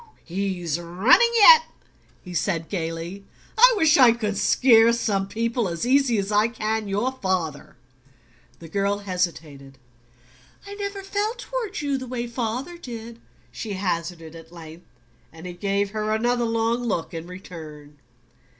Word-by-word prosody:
"He's 175 -3 -3
running 200 - +4
yet!" 475 +2 +8 0.6
he 180 - -9
said 165 -2 -2
gaily. 170 +1 -5 0.3
"I - - +6
wish 320 -5 +4
I 250 -4 +7
could 215 -3 -3
scare 230 +1 +5
some 200 -4 -1
people 230 +1 -1
as 170 +4 -3
easy 260 -2 +3
as 200 +1 -2
I 210 +1 +3
can 220 -2 -3
your 205 +6 -1
father." 185 - -3 0.8
The 165 - -12
girl 200 +3 -1
hesitated. 165 -8 -4 0.9
"I 400 - -8
never 400 -1 -5
felt 415 +4 -2
toward 485 -6 -5
you 280 -2 -1
the 260 - -7
way 240 -1 -4
father 245 +8 -4
did," 235 -4 -9 0.3
she 215 -3 -6
hazarded 170 -3 -4
at 165 0 -13
length; 165 0 -12 0.4
and 160 +2 -13
he 180 - -6
gave 200 +2 -1
her 215 0 -2
another 240 +2 +1
long 230 +1 0
look 175 -7 -3
in 165 +1 -6
return. 155 -5 -11
205 Hz, 145 wpm, -23 LUFS, 175-245 Hz, 0.9 s, yet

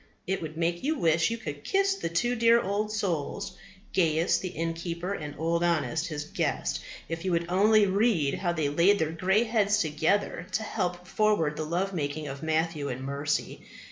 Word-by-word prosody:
It 190 +2 -1
would 155 -1 -6
make 170 +1 -1
you 310 +3 0
wish 165 -1 +3
you 230 - -2
could 145 -9 -7
kiss 390 0 +2
the 390 - -3
two 240 +9 +1
dear 230 0 +5
old 210 +1 -1
souls, 200 -2 -2 0.4
Gaius 165 -1 +2
the 185 - -4
innkeeper 170 +2 -3
and 150 -6 -6
Old 170 +2 0
Honest 170 0 +1
his 150 -4 -4
guest, - - -2 0.3
if 165 0 -4
you 190 - 0
would 170 0 +1
only 210 +3 +5
read 195 -7 +2
how 175 -2 -1
they 160 -4 0
laid 170 +8 +4
their 160 -4 0
grey 190 +6 +2
heads 215 -3 +2
together 165 +2 0
to 220 - 0
help 180 -5 -2
forward 205 -8 +2
the 155 - -3
love 180 +5 -1
making 150 -2 -3
of 140 0 -6
Matthew 160 -2 0
and 130 +1 -5
Mercy. 140 +2 -2
170 Hz, 185 wpm, -28 LUFS, 155-200 Hz, 0.4 s, dear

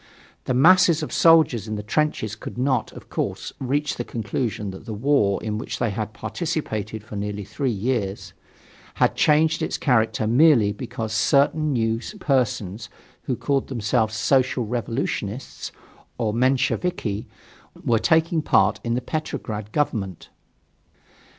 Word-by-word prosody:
The 130 - 0
masses 165 +2 +5
of - - -5
soldiers 160 - +4
in 110 - -3
the 105 - -5
trenches 110 -3 -1
could 110 - -9
not, 130 -2 0
of - - -12
course, - - -3
reach 145 +3 -1
the 120 - -2
conclusion 110 -2 -3
that 95 - -11
the 110 - -4
war, 105 -4 +2
in 105 -1 -2
which 125 - -5
they 120 - 0
had 105 +1 -3
participated 110 - -4
for 110 - -9
nearly 105 0 -3
three 125 +7 -2
years, 100 -5 -2 0.6
had - - +2
changed 155 +1 +3
its - - -1
character 110 -5 +1
merely 120 -3 +5
because 115 0 -5
certain 145 +5 +2
new 115 -3 +1 0.2
persons, 110 - -1 0.4
who 130 - -1
called 140 +2 -1
themselves 110 -2 0
"Social 125 +2 +2
Revolutionists" 115 0 -3 0.5
or 110 -3 -1
"Mensheviki," 130 - 0 0.6
were 115 -2 +3
taking 160 +4 +2
part 100 -7 +3
in 115 0 -1
the 125 - -1
Petrograd 110 -7 -4
Government. 105 - -2
115 Hz, 135 wpm, -23 LUFS, 105-140 Hz, 0.6 s, masses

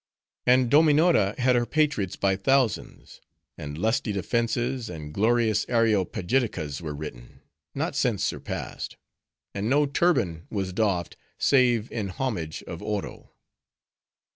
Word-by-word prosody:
And 125 0 +5
Dominora 150 - +4
had 125 0 +3
her 120 -1 +1
patriots 150 -12 0
by 95 -1 +1
thousands; 120 +2 -1 0.3
and 75 0 -7
lusty 110 +4 0
Defenses, 120 +4 -1
and 75 -3 -8
glorious 110 +1 +2
Areopagiticas 105 - 0
were 75 -3 -5
written, 70 -5 -9 0.3
not - - -2
since - - +1
surpassed; - - -4 0.6
and 100 +3 -2
no 145 +3 +4
turban 140 - 0
was 95 -3 -3
doffed 95 -5 -1 0.2
save 125 -4 +3
in 110 -4 -3
homage 90 -6 -4
of 85 - -8
Oro. 105 -2 -5
110 Hz, 115 wpm, -26 LUFS, 90-125 Hz, 0.6 s, And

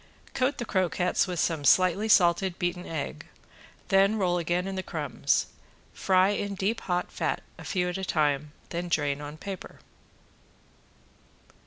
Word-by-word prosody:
Coat 260 +2 0
the 240 - -4
croquettes 185 -2 +1
with 180 -2 -3
some 160 -3 0
slightly 185 +7 +4
salted 175 -1 +4
beaten 175 0 -2
egg. 145 - -5 0.6
Then 195 +2 +4
roll 180 -3 +1
again 175 +2 0
in 195 - -3
the 190 - -2
crumbs. - - -1 0.5
Fry 190 0 +3
in 200 -1 -2
deep 200 +5 -1
hot 180 -1 -2
fat, - - -2 0.2
a - - -9
few 180 -2 -1
at 180 +1 -3
a - - -5
time, 150 -4 0 0.2
then 175 +1 -3
drain 145 -3 0
on 145 +1 -7
paper. 195 +3 -8
180 Hz, 150 wpm, -27 LUFS, 170-195 Hz, 0.6 s, slightly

